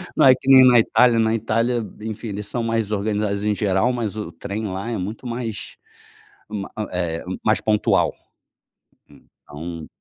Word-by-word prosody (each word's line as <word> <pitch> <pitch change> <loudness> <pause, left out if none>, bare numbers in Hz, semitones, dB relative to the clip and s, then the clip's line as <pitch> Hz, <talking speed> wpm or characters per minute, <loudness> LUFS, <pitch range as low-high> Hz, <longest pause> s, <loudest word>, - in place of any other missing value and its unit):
não - - +4
é 130 - +9
que 130 - -8
nem 130 -1 +9
na 125 -2 +7
Itália, 115 +1 +4
na 110 0 +2
Itália, 115 +2 0 0.2
enfim, 110 +1 -5
eles 105 0 -5
são 120 +1 -3
mais 115 -2 -1
organizados 105 0 -1
em 105 - +1
geral, 100 +3 +1
mas 115 -4 -3
o 105 -1 -5
trem 105 +2 -5
lá 95 +5 -4
é 115 - -2
muito 105 +7 -5
mais 115 -3 -5 0.7
ma 105 -2 -5 0.2
eh, 85 -2 -2 0.2
mais 110 -1 +2
pontual, 105 -1 +2 1.0
então. 80 +2 -10
110 Hz, 160 wpm, -22 LUFS, 100-115 Hz, 1.0 s, é